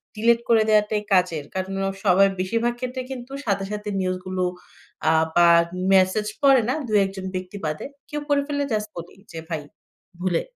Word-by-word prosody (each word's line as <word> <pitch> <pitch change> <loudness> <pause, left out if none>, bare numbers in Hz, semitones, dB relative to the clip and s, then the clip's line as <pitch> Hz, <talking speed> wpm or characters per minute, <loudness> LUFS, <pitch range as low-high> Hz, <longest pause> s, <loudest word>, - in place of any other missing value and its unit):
Delete 230 +2 +3
করে 225 -1 +5
দেওয়াটাই 210 0 +3
কাজের। 180 -5 +2
কারণ 190 +1 -3
অ - - 0 0.2
সবাই 195 +1 +6
বেশিরভাগ 230 +6 0
ক্ষেত্রে 255 +1 -4
কিন্তু 255 0 -7
সাথে, 200 -2 0
সাথে 210 0 -4
নিউজ 185 0 -1
গুলো 185 0 -2 0.7
আ - - +5 0.2
বা 175 0 +6 0.5
মেসেজ 190 +3 +3
পড়ে 275 -3 +6
না, 255 - +2
২ 215 - +2
১ - - -4
জন 190 - -6
ব্যক্তি 185 +2 -5
বাদে। 155 0 -3 0.2
কেউ 295 -1 -4
পড়ে 285 -1 +3
ফেললে 285 -1 -1
জাস্ট 210 0 -1
বলি 170 0 -8 0.2
যে, 165 - -8
"ভাই 160 -3 -2 0.6
ভুলে।" 180 -2 0
205 Hz, 180 wpm, -23 LUFS, 185-235 Hz, 0.7 s, সবাই